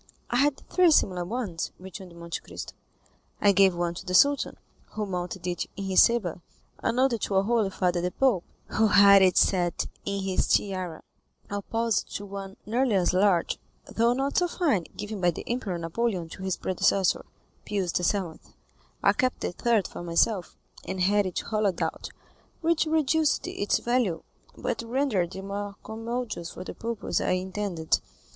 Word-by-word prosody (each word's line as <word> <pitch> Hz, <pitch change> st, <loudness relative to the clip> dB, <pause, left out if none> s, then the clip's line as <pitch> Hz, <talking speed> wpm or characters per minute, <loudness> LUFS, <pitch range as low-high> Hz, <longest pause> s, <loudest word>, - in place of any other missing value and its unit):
"I 240 Hz, -, +2 dB
had 280 Hz, +1 st, +1 dB
three 365 Hz, -2 st, +4 dB
similar 185 Hz, -, +3 dB
ones," 195 Hz, -4 st, -3 dB
returned 185 Hz, -1 st, -10 dB
Monte 170 Hz, 0 st, -5 dB
Cristo. -, -, -8 dB, 0.7 s
"I 205 Hz, -, +5 dB
gave 190 Hz, -1 st, +5 dB
one 175 Hz, 0 st, -1 dB
to 170 Hz, -, -8 dB
the 180 Hz, -1 st, -2 dB
Sultan, 285 Hz, +7 st, +4 dB, 0.4 s
who 210 Hz, -1 st, -2 dB
mounted 180 Hz, -1 st, -4 dB
it 175 Hz, -1 st, -2 dB
in 200 Hz, -, -4 dB
his 190 Hz, -1 st, +5 dB
sabre; 205 Hz, -8 st, +2 dB, 0.4 s
another 250 Hz, 0 st, +1 dB
to 200 Hz, -, -2 dB
our 190 Hz, -, +4 dB
holy 220 Hz, -1 st, +2 dB
father 180 Hz, -2 st, 0 dB
the 180 Hz, -, 0 dB
Pope, 210 Hz, -3 st, +2 dB, 0.3 s
who 220 Hz, 0 st, +3 dB
had 200 Hz, -1 st, +7 dB
it 185 Hz, -1 st, +4 dB
set 175 Hz, -3 st, +2 dB, 0.2 s
in 200 Hz, -1 st, -2 dB
his 190 Hz, -1 st, 0 dB
tiara, 185 Hz, -5 st, 0 dB, 0.5 s
opposite 225 Hz, +2 st, -1 dB
to 205 Hz, -, -4 dB
one 195 Hz, -1 st, -7 dB
nearly 235 Hz, +1 st, +1 dB
as 185 Hz, -2 st, +2 dB
large, 185 Hz, -2 st, +2 dB, 0.3 s
though 235 Hz, +1 st, +2 dB
not 270 Hz, +2 st, -1 dB
so 355 Hz, -, +3 dB
fine, 290 Hz, -, 0 dB
given 210 Hz, -1 st, -5 dB
by 175 Hz, -, +4 dB
the 170 Hz, -, -4 dB
Emperor 230 Hz, -7 st, -2 dB
Napoleon 175 Hz, +2 st, -2 dB
to 185 Hz, -, -10 dB
his 190 Hz, -1 st, -1 dB
predecessor, 185 Hz, 0 st, +1 dB, 0.4 s
Pius 195 Hz, -4 st, -1 dB
VII. 180 Hz, -1 st, 0 dB, 0.6 s
I -, -, +5 dB
kept 255 Hz, 0 st, 0 dB
the -, -, -1 dB
third 220 Hz, +1 st, +1 dB
for -, -, -8 dB
myself, 175 Hz, +3 st, 0 dB, 0.3 s
and 190 Hz, -, -4 dB
I -, -, +4 dB
had 205 Hz, +2 st, +3 dB
it 180 Hz, -, -5 dB
hollowed 210 Hz, -5 st, 0 dB
out, -, -, -3 dB, 0.5 s
which 330 Hz, -1 st, +2 dB
reduced 310 Hz, -1 st, +2 dB
its 200 Hz, -, 0 dB
value, 235 Hz, -9 st, 0 dB, 0.3 s
but -, -, -2 dB
rendered 230 Hz, -7 st, 0 dB
it 190 Hz, -, -6 dB
more 200 Hz, 0 st, -5 dB
commodious 225 Hz, -5 st, -4 dB
for 180 Hz, -, -8 dB
the -, -, -7 dB
purpose 230 Hz, -2 st, -2 dB
I -, -, +1 dB
intended." 185 Hz, -3 st, -1 dB
200 Hz, 170 wpm, -27 LUFS, 180-235 Hz, 0.7 s, had